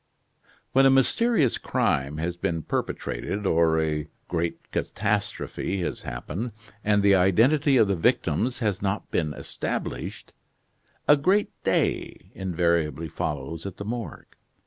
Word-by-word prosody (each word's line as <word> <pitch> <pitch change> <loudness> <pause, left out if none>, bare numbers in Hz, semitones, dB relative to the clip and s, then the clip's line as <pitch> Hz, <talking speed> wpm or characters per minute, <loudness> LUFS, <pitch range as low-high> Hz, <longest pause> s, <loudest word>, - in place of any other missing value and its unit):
When 135 +1 +6
a - - +6
mysterious 135 - +3
crime 70 +2 0
has 85 +2 -2
been 85 -2 -2
perpetrated, 100 +12 -3
or 80 -2 +3
a 75 -1 -1 0.2
great 85 0 -3
catastrophe 100 -2 -2
has - - -3
happened, 85 - -5 0.3
and 105 -1 +3
the 100 -1 +6
identity 130 - +4
of 110 - +5
the 100 - +1
victims 100 - +1
has 105 -6 -1
not 100 +1 -2
been 75 -3 0
established, - - -5 0.7
"a 150 - +8
great 190 +8 +2
day" - - -1
invariably 85 -4 0
follows 75 +5 -4
at 95 - -8
the 100 - -6
Morgue. 115 -5 -6
95 Hz, 125 wpm, -26 LUFS, 80-115 Hz, 0.7 s, a